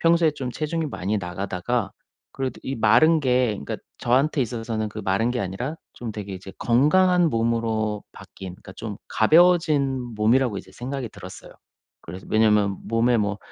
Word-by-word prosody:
평소에 165 -1 +4
좀 130 -4 -5
체중이 160 +2 -2
많이 105 -5 -2
나가다가 95 +4 -2 0.4
그래도 135 -1 -4
이 135 - -4
마른 155 +7 +5
게 125 -2 +2
그러니까 105 -2 -4 0.2
저한테 135 +5 +2
있어서는 115 -2 -3
그 110 +1 -7
마른 100 +5 +1
게 125 - -1
아니라 100 - -3 0.2
좀 115 -3 -6
되게 100 -2 -6
이제 95 +1 -9
건강한 175 +8 +4
몸으로 115 -2 0
바뀐 95 -2 -10
그러니까 95 - -13
좀 105 -3 -6
가벼워진 145 -3 +3
몸이라고 115 +1 +2
이제 - - -12
생각이 130 0 -5
들었어요. 95 -3 -11 0.5
그래서 90 +3 -9
왜냐하면 105 -2 +3
몸에 115 +2 +2
뭐 105 0 -1
115 Hz, 370 characters per minute, -24 LUFS, 105-135 Hz, 0.5 s, 마른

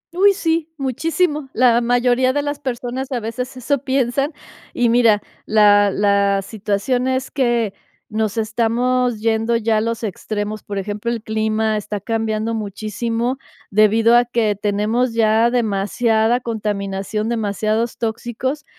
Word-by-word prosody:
Uy, 400 +2 +5
sí. 330 -3 0
Muchísimo. 295 +2 -1
La 240 -1 +4
mayoría 245 +2 +2
de 290 0 0
las 290 0 -3
personas 255 0 -4
a 250 - -1
veces 250 +4 -5
eso 280 +3 0
piensan. 270 +2 0 0.4
Y 245 -1 +2
mira, 230 -3 +4 0.2
la 205 -1 +5
la 200 0 +2
situación 220 +5 -1
es 260 0 -1
que 240 -6 0 0.4
nos 220 0 -2
estamos 235 +2 0
yendo 225 +1 +1
ya 225 -1 +1
a - - +1
los 230 0 -3
extremos. 210 +1 -4
Por 200 -1 -6
ejemplo, 205 +4 -3
el 230 -2 -3
clima 220 0 0
está 210 0 -4
cambiando 220 +1 -2
muchísimo, 225 +4 -3 0.3
debido 220 +3 +4
a 240 - +5
que 230 -4 0
tenemos 210 +4 0
ya 225 +1 +3
demasiada 225 +1 +1
contaminación, 210 -2 -3
demasiados 220 0 -1
tóxicos. 240 +5 -3
230 Hz, 135 wpm, -19 LUFS, 215-250 Hz, 0.4 s, Uy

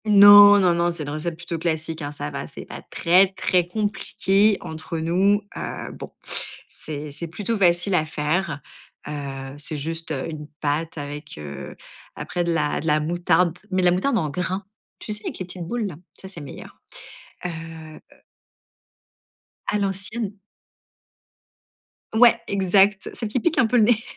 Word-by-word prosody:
Non, 205 0 +9
non, 180 -3 +4
non, 170 0 +1
c'est 170 -2 -5
une 145 - -5
recette 155 +3 -3
plutôt 170 0 -5
classique, 160 0 -2
hein. 145 0 -4
Ça 145 - -5
va, - - -5
c'est - - -9
pas - - -9
très, 180 +3 +4
très 180 -2 +1
compliqué 205 0 +2
entre 160 +1 -6
nous, 185 +6 +2
heu, - - -5
bon - - -9 0.6
c'est 150 -1 -7
c'est 170 +4 -6
plutôt 205 +7 -2
facile 180 -1 +3
à 155 -3 +2
faire, 155 +1 -1 0.5
heu, 135 -2 -6
c'est 155 +1 -1
juste, 165 +3 -5
heu, 135 -3 -2
une 155 -2 -7
pâte 155 +3 -1
avec, 145 - -7
heu, 70 -2 -8 0.4
après 175 - -3
de 170 - 0
la 150 -3 +1
de 160 - -5
la 150 0 +4
moutarde, 175 +2 +1
mais 185 -1 0
de - - +3
la 175 - +6
moutarde 210 +8 +1
en 160 -6 0
grains. 185 +4 -3 0.3
Tu 215 - -5
sais, 210 - -7
avec - - -5
les 185 - -5
petites 175 -1 -7
boules? 225 0 -2 0.3
Ça, 190 - -9
c'est 190 -4 -9
meilleur, 140 - -11 0.6
heu 180 - -1
heu 160 -1 -9 1.7
À 210 - +1
l'ancienne. 195 +2 -3 1.8
Ouais, 235 +1 +6
exact, 195 +1 +3
celle 225 - -4
qui 250 - 0
pique 325 +7 0
un 250 - +4
peu 245 - +2
le 225 - +6
nez 235 +1 +3
175 Hz, 170 wpm, -23 LUFS, 155-200 Hz, 1.8 s, Non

